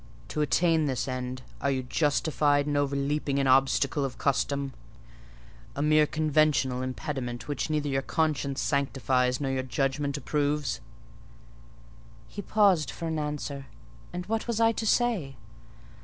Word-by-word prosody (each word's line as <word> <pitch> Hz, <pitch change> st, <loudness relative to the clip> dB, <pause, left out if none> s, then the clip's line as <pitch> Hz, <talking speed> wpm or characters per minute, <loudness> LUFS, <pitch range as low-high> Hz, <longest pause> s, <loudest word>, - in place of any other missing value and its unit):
To 150 Hz, -, -2 dB
attain 160 Hz, +3 st, +3 dB
this 130 Hz, -3 st, -1 dB
end, 130 Hz, 0 st, -4 dB, 0.2 s
are 140 Hz, -, +1 dB
you 130 Hz, -1 st, 0 dB
justified 145 Hz, +1 st, +1 dB
in 145 Hz, 0 st, -1 dB
overleaping 140 Hz, 0 st, 0 dB
an 140 Hz, -, +2 dB
obstacle 135 Hz, +2 st, +3 dB
of 135 Hz, -2 st, -4 dB
custom—a 140 Hz, 0 st, 0 dB, 1.1 s
mere 155 Hz, 0 st, +4 dB
conventional 155 Hz, -4 st, +2 dB
impediment 130 Hz, -3 st, -4 dB
which 145 Hz, +1 st, -2 dB
neither 150 Hz, -1 st, 0 dB
your 135 Hz, -1 st, 0 dB
conscience 145 Hz, -2 st, -1 dB
sanctifies 130 Hz, -2 st, +1 dB
nor 135 Hz, -2 st, -1 dB
your 130 Hz, 0 st, 0 dB
judgment 135 Hz, +3 st, -1 dB
approves?" 145 Hz, -1 st, -1 dB, 1.5 s
He 205 Hz, -, -7 dB
paused 190 Hz, -, +3 dB
for 165 Hz, -, -5 dB
an 160 Hz, -1 st, -1 dB
answer: 145 Hz, -2 st, -4 dB, 0.4 s
and 180 Hz, 0 st, -5 dB
what 225 Hz, +4 st, -2 dB
was 235 Hz, -2 st, -1 dB
I 225 Hz, 0 st, +5 dB
to 225 Hz, 0 st, -3 dB
say? 210 Hz, -, +1 dB
145 Hz, 135 wpm, -28 LUFS, 135-155 Hz, 1.5 s, I